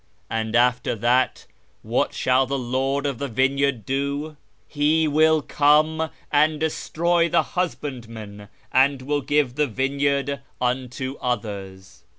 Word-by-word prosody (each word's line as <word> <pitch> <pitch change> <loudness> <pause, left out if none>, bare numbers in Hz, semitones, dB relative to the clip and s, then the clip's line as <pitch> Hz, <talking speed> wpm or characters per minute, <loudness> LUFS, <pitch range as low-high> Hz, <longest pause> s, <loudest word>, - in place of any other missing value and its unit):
And 110 0 -2
after 125 0 +2
that 120 +4 +1 0.4
what - - 0
shall 130 0 +2
the 140 +1 -1
Lord 135 +3 -1
of 140 -4 -2
the 140 - -2
vineyard 135 -1 0
do? 140 +3 -2 0.3
'He 155 +2 +2
will 155 0 +3
come 155 +2 +3 0.2
and 150 +1 +3
destroy 170 +2 0
the - - +3
husbandmen, 115 - -5 0.2
and 135 0 +3
will 145 +2 -1
give 145 -2 +1
the 150 +2 +1
vineyard 140 +2 -1 0.2
unto 130 +1 -2
others.'" 100 -5 -5
135 Hz, 125 wpm, -23 LUFS, 125-150 Hz, 0.4 s, will